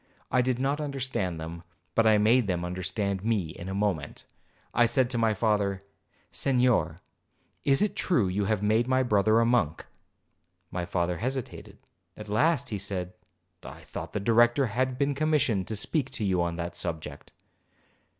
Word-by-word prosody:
I 125 - +4
did 125 0 0
not 140 +3 -1
understand 130 - -2
them, 80 +1 -7 0.3
but 115 -1 +3
I 110 -1 +6
made 110 +2 +3
them 90 -2 -1
understand 95 +2 -2
me 105 -7 0
in 90 +3 -8
a 95 - -3
moment. 95 -7 -2 0.5
I 120 0 +4
said 130 +1 +1
to 120 - 0
my 110 -2 +2
father, 100 -2 0 0.5
'Senhor, 125 - +2 0.7
is 135 +6 +4
it 210 - -1
true 125 - +1
you 100 +2 -1
have 105 -1 0
made 110 +3 +2
my 130 0 +2
brother 110 -1 +3
a 115 - +3
monk?' 115 -10 +1 0.9
My 90 -1 -3
father 85 -1 -1
hesitated; 130 +1 -5 0.4
at 105 -1 -9
last 145 +10 +2
he 105 - -3
said, 95 -2 -3 0.5
'I - - -10
thought - - -8
the - - -1
Director 120 +5 +4
had 125 +3 -1
been 140 +1 +1
commissioned 135 - +1
to 110 - -3
speak 135 +6 +1
to 105 - -2
you 95 -2 +1
on 85 -1 -1
that 85 0 -5
subject.' 80 -2 -5
110 Hz, 170 wpm, -27 LUFS, 95-125 Hz, 0.9 s, I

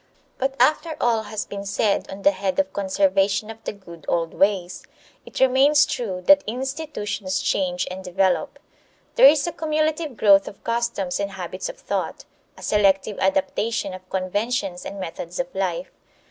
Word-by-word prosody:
But 270 +1 -1
after 305 +4 +2
all 230 -2 +2
has 215 -1 -4
been 200 0 -6
said 200 +1 0
on 195 +1 -8
the 195 - +6
head 190 0 -2
of 290 0 0
conservation 195 +2 +1
of 225 0 -13
the - - -2
good 170 -6 -13
old 165 -1 0
ways, 190 -3 0 0.4
it - - -7
remains 275 +3 +5
true 190 -10 -4
that 290 0 +7
institutions 225 -7 -3
change 180 -1 0
and 190 +1 -7
develop. 185 +1 0 0.6
There - - +8
is 290 0 +5
a 345 - -2
cumulative 310 -3 -1
growth 200 -2 +5
of 200 - -10
customs 230 -6 -1
and 200 -1 -3
habits 185 - -5
of - - -8
thought; - - -4 0.3
a - - -12
selective 200 0 +2
adaptation 195 +2 0
of 185 0 -11
conventions 195 0 -2
and 200 - -7
methods 175 +1 -6
of 265 0 -3
life. 190 +4 -2
200 Hz, 160 wpm, -23 LUFS, 190-260 Hz, 0.6 s, There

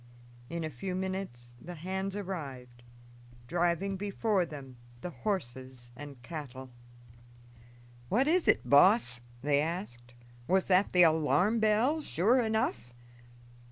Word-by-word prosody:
In 170 0 -3
a 155 - -2
few 180 +9 -4
minutes 185 -11 -5
the 175 +1 -8
hands 190 +4 -3
arrived, 135 -11 -6 0.6
driving 175 +5 0
before 200 -1 0
them 135 -5 -10 0.2
the 180 - -5
horses 130 - -5
and 140 -1 -10
cattle. 130 -5 -8 1.4
"What 260 +6 +2
is 345 +2 +2
it, - - +3
boss?" 140 - +5 0.2
they 145 0 +3
asked. 135 -8 -5 0.3
"Was 190 +1 +2
that 185 +2 +4
the 180 -1 +6
alarm 160 - +3
bell 220 +9 +2
sure 240 - +2
enough?" 130 - -1
175 Hz, 120 wpm, -31 LUFS, 130-195 Hz, 1.4 s, the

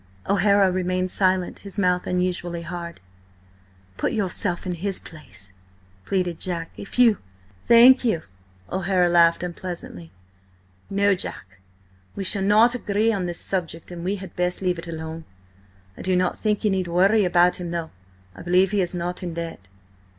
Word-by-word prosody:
O'Hara 200 0 +4
remained 185 0 -1
silent, 185 -2 +1
his 200 0 -9
mouth 180 -2 +1
unusually 180 -1 -2
hard. 170 0 -7 1.0
"Put - - -1
yourself 190 -3 -1
in 180 - -2
his 190 +3 -1
place," 95 - -7 0.5
pleaded 180 -4 -1
Jack. 170 -3 -3
"If 200 - -8
you—" 235 -5 +5 0.5
"Thank 245 +3 +8
you!" 195 -10 0 0.5
O'Hara 185 -1 +2
laughed 170 0 +4
unpleasantly. 170 - -7 0.8
"No, 200 0 +3
Jack, 95 - -5 0.6
we 195 - -3
shall 195 +1 0
not 215 +5 +5
agree 220 -1 0
on 190 -3 -2
this 175 -1 -4
subject, 170 -3 -3
and 170 -1 -7
we 190 +3 -1
had 190 -3 -9
best 180 0 -1
leave 180 -3 -1
it 165 - -8
alone. 160 0 -6 0.7
I - - -10
do 185 0 +1
not 180 0 +1
think 210 -1 -1
you 210 - +2
need 190 -2 -1
worry 195 +5 +3
about 180 0 +3
him, 175 -1 -5
though. 170 -1 -4 0.4
I - - -10
believe 185 +2 +3
he 205 -2 +2
is 180 0 -2
not 175 +1 -3
in 175 -3 -5
debt." 165 - -6
180 Hz, 160 wpm, -23 LUFS, 170-195 Hz, 1.0 s, Thank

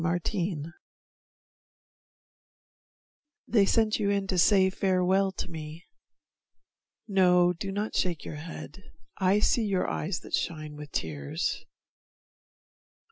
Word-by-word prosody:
Erinna 170 -2 -2 2.7
They 205 -4 +4
sent 220 0 +2
you 205 -2 +1
in 200 -1 +1
to 190 -1 -2
say 190 0 +5
farewell 190 +1 +2
to - - -5
me, 160 0 -8 1.2
No, 180 -3 +4
do 195 +3 -5
not 205 +2 -3
shake 175 -5 -1
your 150 - -6
head; 160 +1 -9 0.4
I 190 +1 +3
see 235 - +2
your 195 -3 0
eyes 170 +2 -2
That - - -13
shine 155 -3 -2
with 150 -1 -9
tears. 70 -3 -3
180 Hz, 110 wpm, -28 LUFS, 165-195 Hz, 2.7 s, say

